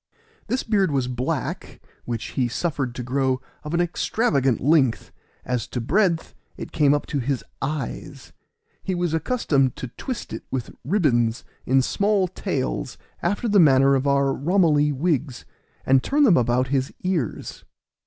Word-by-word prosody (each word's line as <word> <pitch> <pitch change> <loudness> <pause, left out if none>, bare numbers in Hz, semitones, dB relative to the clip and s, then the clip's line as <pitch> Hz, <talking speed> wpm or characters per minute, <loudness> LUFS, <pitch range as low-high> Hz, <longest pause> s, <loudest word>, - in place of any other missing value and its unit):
This 250 +4 -1
beard 200 -5 +2
was 135 -4 0
black, 125 0 -3 0.3
which 115 -2 -4
he 130 -2 0
suffered 135 -2 -2
to 125 - -4
grow 130 +1 0 0.2
of 150 +3 -3
an - - +1
extravagant 160 - +1
length; 135 -4 +2 0.3
as 125 -3 -2
to 125 - -4
breadth, 170 - +1 0.2
it - - -7
came 145 -2 +3
up 145 - -2
to 145 - -2
his 135 0 -2 0.2
eyes. 135 -2 -5 0.5
He 190 - -2
was 175 -2 -1
accustomed 155 - +1
to 125 - -6
twist 250 - -6
it - - -5
with 130 -4 -4
ribbons, 125 - +1 0.2
in 130 +1 +4
small 200 +4 +1
tails, 140 -8 -3 0.2
after 200 +7 -1
the 205 -2 +4
manner 135 -4 +5
of 135 +1 +1
our 140 -1 +2
Ramilie 150 -2 +2
wigs, 140 -3 -1 0.4
and 130 0 +4
turn 290 - +2
them 215 -11 +6
about 125 +1 +1
his 135 -1 0
ears. 175 - -3
140 Hz, 155 wpm, -23 LUFS, 130-175 Hz, 0.5 s, them